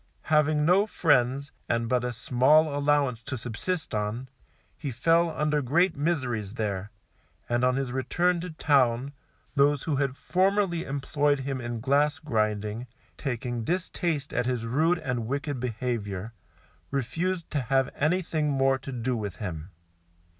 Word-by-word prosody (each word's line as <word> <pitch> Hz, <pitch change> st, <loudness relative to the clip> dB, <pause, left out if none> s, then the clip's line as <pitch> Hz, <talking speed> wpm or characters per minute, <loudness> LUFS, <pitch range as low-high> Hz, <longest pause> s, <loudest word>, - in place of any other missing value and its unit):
Having 150 Hz, 0 st, +4 dB
no 190 Hz, +5 st, +4 dB
friends, 140 Hz, -, +2 dB, 0.2 s
and 115 Hz, -1 st, +1 dB
but 125 Hz, 0 st, +1 dB
a 125 Hz, -, -1 dB
small 140 Hz, +6 st, +3 dB
allowance 145 Hz, -4 st, +2 dB
to 130 Hz, +3 st, -4 dB
subsist 125 Hz, +10 st, -3 dB
on, 110 Hz, +5 st, -2 dB, 0.5 s
he 145 Hz, -, -5 dB
fell 165 Hz, +8 st, +3 dB
under 150 Hz, -1 st, 0 dB
great 170 Hz, +9 st, +2 dB
miseries 125 Hz, -, -1 dB
there, 100 Hz, -3 st, -2 dB, 0.6 s
and 120 Hz, +1 st, 0 dB
on 125 Hz, 0 st, +3 dB
his 135 Hz, -2 st, -2 dB
return 175 Hz, +7 st, +1 dB
to 180 Hz, +2 st, -5 dB
Town, 140 Hz, -4 st, +2 dB, 0.4 s
those 145 Hz, -1 st, +3 dB
who 150 Hz, -4 st, 0 dB
had 135 Hz, -1 st, -1 dB
formerly 190 Hz, -2 st, +1 dB
employed 145 Hz, +1 st, 0 dB
him 135 Hz, -1 st, -3 dB
in 120 Hz, -1 st, -4 dB
glass 145 Hz, +4 st, +2 dB
grinding, 110 Hz, -4 st, -1 dB, 0.3 s
taking 120 Hz, -3 st, -3 dB
distaste 170 Hz, -, -2 dB
at 125 Hz, -1 st, 0 dB
his 125 Hz, -3 st, -1 dB
rude 160 Hz, +9 st, +2 dB
and 125 Hz, -7 st, -3 dB
wicked 140 Hz, +1 st, -2 dB
behaviour, 115 Hz, -4 st, -3 dB, 0.6 s
refused 165 Hz, +7 st, -2 dB
to 145 Hz, -, 0 dB
have 135 Hz, +2 st, +1 dB
anything 155 Hz, -1 st, 0 dB
more 135 Hz, -1 st, +2 dB
to 135 Hz, +1 st, -7 dB
do 125 Hz, 0 st, -1 dB
with 105 Hz, -4 st, -4 dB
him. 85 Hz, -4 st, -6 dB
135 Hz, 145 wpm, -27 LUFS, 120-150 Hz, 0.6 s, Having